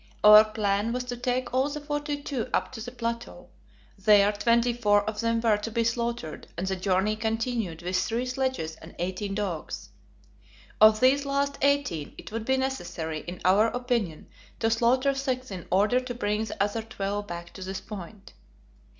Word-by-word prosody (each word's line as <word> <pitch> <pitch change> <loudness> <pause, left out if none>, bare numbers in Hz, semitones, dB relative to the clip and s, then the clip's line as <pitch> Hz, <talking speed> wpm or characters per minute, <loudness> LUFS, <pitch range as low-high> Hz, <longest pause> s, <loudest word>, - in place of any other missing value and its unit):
Our 210 0 +10
plan 215 0 -1
was 250 0 -2
to 250 0 -5
take 250 +1 -2
all 260 +3 +2
the 300 +1 -4
forty 295 0 -3
two 255 -4 -3
up - - -1
to 240 -4 -8
the 245 - -5
plateau; 235 -1 -5 0.5
there 205 0 +5
twenty 235 +3 +2
four 205 -3 +2
of 215 -1 -3
them 230 0 +1
were 225 -3 +3
to 210 +2 -5
be 230 +1 0
slaughtered, 235 -7 -2
and 180 - -2
the 190 0 -1
journey 190 +3 +1
continued 220 -6 -2
with 180 +1 0
three 235 +6 -1
sledges 255 -11 -2
and 160 - -13
eighteen 185 +3 -3
dogs. 190 -7 -4 0.9
Of 215 +1 +7
these 270 +2 +4
last 280 0 -1
eighteen, 280 - +1
it - - -10
would 225 0 -4
be 265 +2 +2
necessary, 185 -12 -3
in 175 +1 -7
our 200 +4 +5
opinion, 235 -9 -2 0.3
to 225 0 +1
slaughter 255 +4 +3
six 260 -3 -3
in 185 -3 -7
order 205 +7 +3
to 250 -1 -6
bring 210 -1 -1
the 200 - -1
other 205 +2 -1
twelve 205 -2 -4
back 170 -1 -7
to 190 - -10
this 190 +1 -4
point. 200 0 -10
225 Hz, 180 wpm, -27 LUFS, 200-250 Hz, 0.9 s, Our